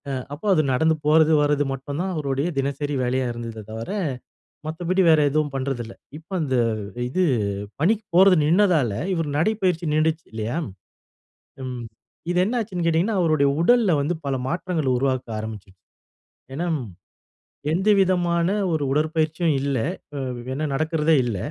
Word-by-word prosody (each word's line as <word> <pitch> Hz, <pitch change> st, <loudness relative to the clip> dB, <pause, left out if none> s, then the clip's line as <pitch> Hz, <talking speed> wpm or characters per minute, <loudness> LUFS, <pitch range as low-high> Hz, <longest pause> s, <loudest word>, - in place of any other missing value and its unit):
அ -, -, -2 dB, 0.2 s
அப்போ 150 Hz, +7 st, -9 dB
அது 160 Hz, -, +4 dB
நடந்து 160 Hz, +5 st, +3 dB
போறது 160 Hz, +1 st, +5 dB
வரது 145 Hz, 0 st, +2 dB
மட்டும் 140 Hz, +2 st, -5 dB
தான் 190 Hz, +1 st, -2 dB
அவருடைய 140 Hz, -3 st, -1 dB
தினசரி 140 Hz, +2 st, -1 dB
வேலையா 130 Hz, +1 st, 0 dB
இருந்ததே 115 Hz, -2 st, -6 dB
தவிர, 115 Hz, +1 st, -6 dB, 0.8 s
மத்தபடி 175 Hz, +4 st, 0 dB
வேற 160 Hz, -1 st, +6 dB
எதுவும் 150 Hz, 0 st, 0 dB
பண்றதில்ல. 130 Hz, -4 st, -3 dB, 0.2 s
இப்ப 160 Hz, +2 st, -16 dB
அந்த 135 Hz, -4 st, 0 dB, 0.5 s
இது 185 Hz, +8 st, +1 dB, 0.6 s
பணிக்கு 215 Hz, +8 st, +1 dB
போறது 190 Hz, +1 st, +7 dB
நின்னதால 165 Hz, -, +3 dB, 0.2 s
இவரு 165 Hz, -4 st, -1 dB
நடைப்பயிற்சி 180 Hz, -1 st, +1 dB
நின்டுச்சு 155 Hz, +1 st, +1 dB
இல்லயா! 110 Hz, +5 st, -3 dB, 1.1 s
ம். 125 Hz, -2 st, -5 dB, 0.5 s
இது 175 Hz, -, 0 dB
என்ன 240 Hz, +5 st, -1 dB
ஆச்சுன்னு 190 Hz, -6 st, -3 dB
கேட்டீங்கன்னா, 170 Hz, +6 st, +2 dB
அவருடைய 155 Hz, -4 st, +3 dB
உடல்ல 230 Hz, +1 st, +4 dB
வந்து 150 Hz, +5 st, 0 dB
பல 135 Hz, -1 st, 0 dB
மாற்றங்கள் 170 Hz, -2 st, -1 dB
உருவாக்க 130 Hz, -1 st, -1 dB
ஆரம்பிச்சிருச்சு. 100 Hz, -4 st, -8 dB, 0.7 s
ஏன்னா, 170 Hz, +5 st, -2 dB, 1.1 s
எந்தவிதமான 180 Hz, -3 st, +2 dB, 0.3 s
ஒரு 155 Hz, -2 st, 0 dB
உடற்பயிற்சியும் 155 Hz, +2 st, +1 dB
இல்ல. 140 Hz, -1 st, 0 dB, 0.4 s
அ -, -, -4 dB, 0.4 s
என்ன 155 Hz, +3 st, -2 dB
நடக்கிறதே 155 Hz, +2 st, +2 dB
இல்ல. 115 Hz, -5 st, -2 dB
155 Hz, 135 wpm, -23 LUFS, 135-175 Hz, 1.1 s, போறது